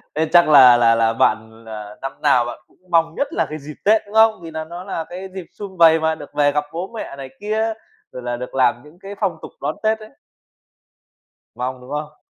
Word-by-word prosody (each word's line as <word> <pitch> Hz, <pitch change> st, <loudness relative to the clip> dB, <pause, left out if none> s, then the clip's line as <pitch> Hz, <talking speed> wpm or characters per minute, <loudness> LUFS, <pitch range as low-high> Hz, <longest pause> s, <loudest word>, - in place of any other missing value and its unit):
Thế 160 Hz, +1 st, +1 dB
chắc 175 Hz, -2 st, +6 dB
là 130 Hz, -5 st, +8 dB
là 115 Hz, -1 st, +4 dB
là 115 Hz, 0 st, +2 dB
bạn 110 Hz, 0 st, 0 dB
là 105 Hz, -1 st, -9 dB
năm 135 Hz, -, -4 dB
nào 130 Hz, -5 st, +3 dB
bạn 120 Hz, -, -7 dB
cũng -, -, -30 dB
mong 165 Hz, -1 st, +2 dB
nhất 280 Hz, -, -1 dB
là 165 Hz, -, +1 dB
cái 155 Hz, -, -5 dB
dịp 150 Hz, +1 st, -10 dB
Tết, 215 Hz, +2 st, +5 dB
đúng 205 Hz, +1 st, -12 dB
không? 220 Hz, -3 st, +5 dB
Vì 165 Hz, -1 st, -9 dB
nà 160 Hz, 0 st, -4 dB
nó 175 Hz, +3 st, -8 dB
là 165 Hz, -, -4 dB
cái 185 Hz, +2 st, -7 dB
dịp 185 Hz, -3 st, -6 dB
sum 195 Hz, -2 st, -9 dB
vầy 165 Hz, -1 st, +6 dB
mà, 160 Hz, 0 st, 0 dB
được -, -, -12 dB
về 145 Hz, -1 st, +3 dB
gặp 150 Hz, +1 st, 0 dB
bố 175 Hz, +3 st, -5 dB
mẹ 215 Hz, -, -6 dB
này 135 Hz, -1 st, -8 dB
kia, 220 Hz, +2 st, -1 dB, 0.4 s
rồi 125 Hz, -, -8 dB
là 120 Hz, 0 st, -3 dB
được 125 Hz, +2 st, -7 dB
làm 120 Hz, -2 st, +2 dB
những 150 Hz, +4 st, -18 dB
cái 195 Hz, +1 st, -9 dB
phong 190 Hz, -6 st, -1 dB
tục -, -, -9 dB
đón -, -, -2 dB
Tết 220 Hz, 0 st, +1 dB
ấy. 215 Hz, -, -12 dB, 1.5 s
Mong, 125 Hz, +1 st, -4 dB
đúng 125 Hz, -, -14 dB
không? 150 Hz, +1 st, -6 dB
155 Hz, 240 wpm, -20 LUFS, 125-185 Hz, 1.5 s, là